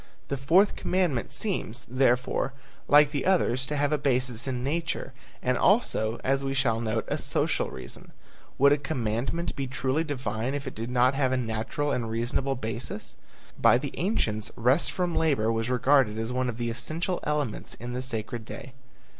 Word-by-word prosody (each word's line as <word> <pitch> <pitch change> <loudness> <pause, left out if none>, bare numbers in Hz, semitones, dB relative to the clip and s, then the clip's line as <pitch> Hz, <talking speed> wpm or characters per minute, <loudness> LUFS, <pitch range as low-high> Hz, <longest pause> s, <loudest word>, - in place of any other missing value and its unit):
The 140 - 0
fourth 165 +10 +4
commandment 175 -10 0
seems, 135 - -2
therefore, 130 +1 +1 0.3
like 145 0 +6
the 145 -3 -2
others 135 -9 +2
to 150 - -2
have 145 0 +1
a 150 - +1
basis 125 -3 0
in 125 -2 -2
nature, 160 -1 -2 0.3
and 125 0 +1
also, 120 - +2
as 135 +1 +1
we 135 0 -2
shall 115 -5 +1
note, 110 0 -1
a - - -1
social - - +1
reason. - - -9 0.5
Would 140 +1 +6
a 145 - +3
commandment 135 +3 -2
be 135 -1 -3
truly 130 +4 0
divine 130 -4 -3
if 145 0 -4
it 130 - -5
did 115 +2 -5
not 125 +1 +3
have 135 -2 +1
a 130 - +2
natural 115 +5 -2
and 120 -4 -1
reasonable 120 +4 -1
basis? 115 -2 -6 0.5
By - - +6
the 140 +2 -5
ancients 110 - -1
rest 125 +8 +3
from 180 -2 -1
labor 135 -9 +2
was 115 +1 -1
regarded 125 -3 +3
as 115 +2 -2
one 125 0 0
of 115 - -5
the 120 -1 -2
essential 160 +10 -2
elements 150 -6 -2
in 120 +1 -7
the 125 - -2
sacred 115 -2 -2
day. 125 +3 -9
130 Hz, 180 wpm, -27 LUFS, 120-145 Hz, 0.5 s, like